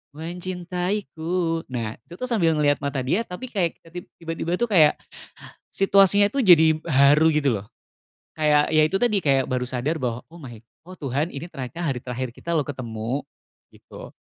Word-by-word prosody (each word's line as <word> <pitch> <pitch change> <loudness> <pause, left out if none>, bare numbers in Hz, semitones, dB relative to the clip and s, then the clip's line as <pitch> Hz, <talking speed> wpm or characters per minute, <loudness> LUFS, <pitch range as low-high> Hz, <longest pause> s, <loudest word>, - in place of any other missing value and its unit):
mencintaiku, 175 0 -3
nah, 115 -3 -5
itu, 170 - -12
tuh, 250 - -8
sambil 180 -10 +2
ngeliat 145 -1 +2
mata 140 -2 -3
dia 165 - +1
tapi 235 +8 -8
kayak 180 -6 -1
ke 165 - -17
tib 175 - -7
tiba-tiba 165 +1 -3
itu 240 - +1
kayak 175 -10 +4 0.8
situasinya 195 +1 +4
itu 275 - 0
jadi 170 -5 +7 0.2
haru, 145 +2 +5
gitu, 140 -9 +1
loh, 105 - -16 0.7
kayak, 150 -1 +3
ya, 155 -1 +4
itu 190 - -4
tadi, 215 0 +2
kayak 135 -6 +2
baru 125 -1 -1
sadar 135 +6 -2
bahwa, 120 -1 -3
"Oh, 170 - -13
my 125 -7 -10 0.3
oh, 185 - -10
Tuhan, 145 0 -2
ini 140 +4 -7
ternyata 140 +4 -6
hari 135 -6 -1
terakhir 125 0 -5
kita, 170 +5 -4
loh, 150 - +2
ketemu." 120 -1 -4 0.5
Gitu. - - -13
160 Hz, 175 wpm, -23 LUFS, 135-180 Hz, 0.8 s, jadi